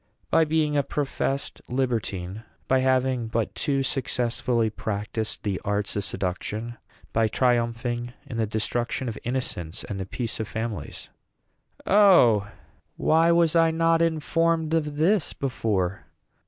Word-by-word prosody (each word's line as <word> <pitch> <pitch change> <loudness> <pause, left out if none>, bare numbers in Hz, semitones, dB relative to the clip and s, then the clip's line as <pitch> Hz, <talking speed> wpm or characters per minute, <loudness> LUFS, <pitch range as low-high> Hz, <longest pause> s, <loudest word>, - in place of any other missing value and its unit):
"By 165 0 +5
being 155 -1 +1
a 145 - +4
professed 140 -1 -2
libertine; 110 -7 -2 0.3
by 130 - +3
having 130 -2 +1
but 115 0 -1
too 140 -2 0
successfully, 120 -3 0
practised 105 +1 -3
the 100 -3 -2
arts 105 0 -1
of 100 - -1
seduction; 105 +6 -3 0.4
by 115 0 +3
triumphing 120 0 0
in 115 - -6
the 110 -1 +1
destruction 120 +4 -2
of 115 - -4
innocence 110 -8 -3
and 100 -2 -5
the 95 - -4
peace 115 +3 -3
of 110 - -2
families." 110 +1 -5 0.8
"O, 175 - +6 0.5
why 165 +2 +4
was 170 -1 +3
I 165 -1 +5
not 165 0 +2
informed 165 0 +1
of 150 -3 0
this 165 +4 +2
before? 100 -8 -2
120 Hz, 130 wpm, -25 LUFS, 110-150 Hz, 0.8 s, O